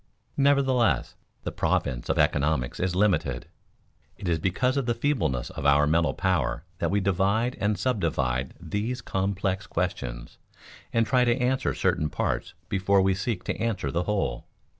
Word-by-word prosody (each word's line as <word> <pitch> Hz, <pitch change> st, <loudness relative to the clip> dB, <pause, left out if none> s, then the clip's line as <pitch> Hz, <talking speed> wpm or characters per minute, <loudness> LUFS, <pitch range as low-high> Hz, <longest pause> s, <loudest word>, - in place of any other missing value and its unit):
Nevertheless 135 Hz, -4 st, +2 dB, 0.3 s
the -, -, -3 dB
province -, -, -1 dB
of -, -, +1 dB
economics 75 Hz, -4 st, +1 dB
is 90 Hz, -1 st, 0 dB
limited. 100 Hz, 0 st, +1 dB, 0.7 s
It 100 Hz, -, -6 dB
is 85 Hz, -2 st, +1 dB
because 120 Hz, -, +1 dB
of 135 Hz, -3 st, -1 dB
the 120 Hz, -, +1 dB
feebleness 105 Hz, -, 0 dB
of -, -, -6 dB
our 70 Hz, +1 st, +5 dB
mental 80 Hz, +2 st, +2 dB
power 80 Hz, -, 0 dB, 0.2 s
that 85 Hz, -, 0 dB
we 100 Hz, +4 st, +2 dB
divide 100 Hz, +6 st, +1 dB
and 105 Hz, 0 st, +1 dB
subdivide 70 Hz, -, -1 dB
these 105 Hz, +9 st, -3 dB
complex 95 Hz, -2 st, -2 dB
questions 60 Hz, -11 st, -4 dB, 0.5 s
and 115 Hz, 0 st, +2 dB
try 125 Hz, +1 st, +3 dB
to 120 Hz, 0 st, +2 dB
answer 130 Hz, +1 st, 0 dB
certain 85 Hz, -5 st, +1 dB
parts -, -, -2 dB
before 100 Hz, 0 st, +2 dB
we 95 Hz, 0 st, +3 dB
seek 95 Hz, 0 st, -2 dB
to -, -, -3 dB
answer 100 Hz, -11 st, -1 dB
the 85 Hz, +4 st, -1 dB
whole. 100 Hz, -12 st, -1 dB
95 Hz, 155 wpm, -26 LUFS, 80-115 Hz, 0.7 s, our